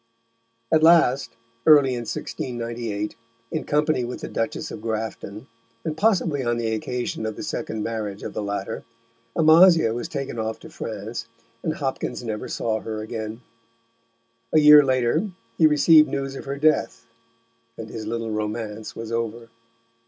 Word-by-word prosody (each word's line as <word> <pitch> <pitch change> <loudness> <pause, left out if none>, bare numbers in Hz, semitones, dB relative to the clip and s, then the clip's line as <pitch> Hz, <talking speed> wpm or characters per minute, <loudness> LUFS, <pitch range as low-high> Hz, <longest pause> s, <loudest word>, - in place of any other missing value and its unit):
At 160 - +4
last, 160 -5 +5 0.4
early 145 -4 +7
in 120 -2 -4
1698, 115 -4 -4 0.4
in 160 - -2
company 150 -3 +1
with 120 +1 -5
the - - -4
Duchess 115 - -3
of - - -7
Grafton, 110 -1 -4 0.4
and 155 - -2
possibly 175 -8 +1
on 120 -1 0
the 115 -1 -1
occasion 120 +1 -3
of 110 - -4
the - - -7
second 110 -1 -3
marriage 105 -3 -4
of - - -5
the - - -3
latter, 100 -1 -4 0.5
Amasia 160 -5 +6
was 120 +1 -4
taken 135 -5 -4
off 110 0 -2
to 160 - -12
France, 110 - -6 0.3
and 155 - -2
Hopkins 135 -3 -3
never 110 -2 -4
saw 110 -1 -1
her 110 0 -5
again. 110 +1 -5 1.1
A 155 - +5
year 150 -1 +9
later 130 - +1 0.3
he 160 - +7
received 155 0 +6
news 135 0 -3
of - - -8
her 140 0 -4
death, 155 +2 +1 0.7
and 110 - -6
his 110 -1 -6
little 115 0 -3
romance 105 0 -4
was 115 0 -6
over. 115 0 -3
120 Hz, 150 wpm, -24 LUFS, 110-150 Hz, 1.1 s, year